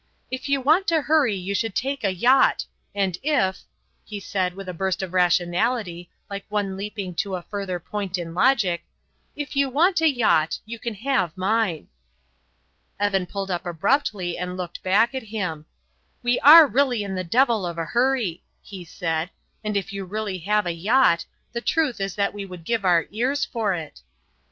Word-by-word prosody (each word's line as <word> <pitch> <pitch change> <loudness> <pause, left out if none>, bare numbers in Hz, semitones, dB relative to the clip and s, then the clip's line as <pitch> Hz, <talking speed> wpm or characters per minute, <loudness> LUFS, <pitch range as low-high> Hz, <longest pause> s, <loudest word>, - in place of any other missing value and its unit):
"If 260 +2 -4
you 275 -1 +2
want 315 +9 +3
to 330 -2 +3
hurry 295 -9 +3
you 190 +1 -4
should 225 0 -1
take 275 0 -2
a 195 - +2
yacht, 245 +9 +3 0.3
and 190 -3 -1
if" 250 -11 +1 0.4
he 210 -1 -7
said, 185 -2 -2
with 195 -1 -8
a 180 - -4
burst 190 +1 -2
of 185 -1 -6
rationality, 180 +1 +1 0.2
like 200 0 -6
one 205 -2 -1
leaping 200 -2 -5
to 195 -2 -1
a 180 - -6
further 195 -3 -4
point 195 0 -4
in 165 -2 -6
logic 185 -4 +2 0.5
"if 290 0 -6
you 275 -1 +2
want 340 +7 +3
a 320 - +5
yacht 220 - +2
you 230 +1 -7
can 230 -2 -4
have 210 - -1
mine." 195 -3 0 1.1
Evan 195 -3 +1
pulled 195 +1 -4
up 175 - -2
abruptly 180 - 0
and 180 0 -4
looked 175 -2 -6
back 215 +6 +3
at 265 - -3
him. 180 -9 -4 0.6
"We 245 0 +2
are 315 +3 +10
really 255 -5 +1
in 195 -1 -5
the 185 -1 -2
devil 230 +3 +2
of 170 -1 -4
a 165 - -2
hurry," 235 -4 0 0.2
he 190 -3 -9
said, 165 0 -3 0.3
"and 210 -1 -1
if 195 0 -4
you 195 0 -4
really 200 0 -4
have 210 +4 +1
a 175 - 0
yacht, 180 0 +3 0.3
the 235 - -3
truth 290 -6 0
is 195 -1 -2
that 200 -1 0
we 205 -1 -5
would 180 -3 -10
give 225 +4 -1
our 175 -4 +3
ears 255 +7 0
for 220 -5 -1
it." 160 -3 -8
200 Hz, 185 wpm, -24 LUFS, 180-245 Hz, 1.1 s, are